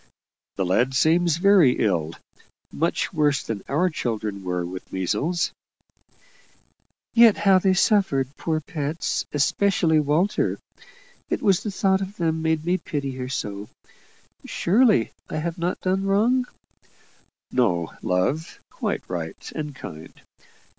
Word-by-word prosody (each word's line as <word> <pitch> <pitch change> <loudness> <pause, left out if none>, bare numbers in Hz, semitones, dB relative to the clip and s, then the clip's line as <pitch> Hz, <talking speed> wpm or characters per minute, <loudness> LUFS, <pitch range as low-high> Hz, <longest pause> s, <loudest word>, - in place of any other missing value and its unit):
"The 95 - -1
lad 125 +9 +1
seems 165 +3 +3
very 185 -8 +5
ill. 85 -6 0 0.6
Much 165 +4 -1
worse 145 -4 +2
than 105 -3 -4
our 155 +7 +2
children 110 - -3
were 90 -1 -2
with 90 +1 -8
measles." 145 - -1 1.6
"Yet 230 -3 +6
how 195 -2 +4
they 190 0 +2
suffered, 145 -10 +2
poor 155 -1 -2
pets! 150 +1 -3
especially 160 +2 +2
Walter. 155 +7 +1 0.7
It - - -2
was 195 -3 +3
the 215 - -4
thought 195 -1 +1
of 195 +2 -6
them 160 -2 0
made 160 -1 0
me 180 +2 +1
pity 140 -3 -4
her 130 0 -5
so. 105 -5 -4 0.7
Surely 210 - +2 0.2
I - - -3
have 165 +3 -3
not 175 +2 -1
done 190 +1 0
wrong?" 240 +6 +2 1.0
"No 90 -10 +1
love; 130 - -1
quite - - -3
right 80 -3 -6
and 150 -2 -5
kind. 80 -10 -10
155 Hz, 125 wpm, -24 LUFS, 120-185 Hz, 1.6 s, Yet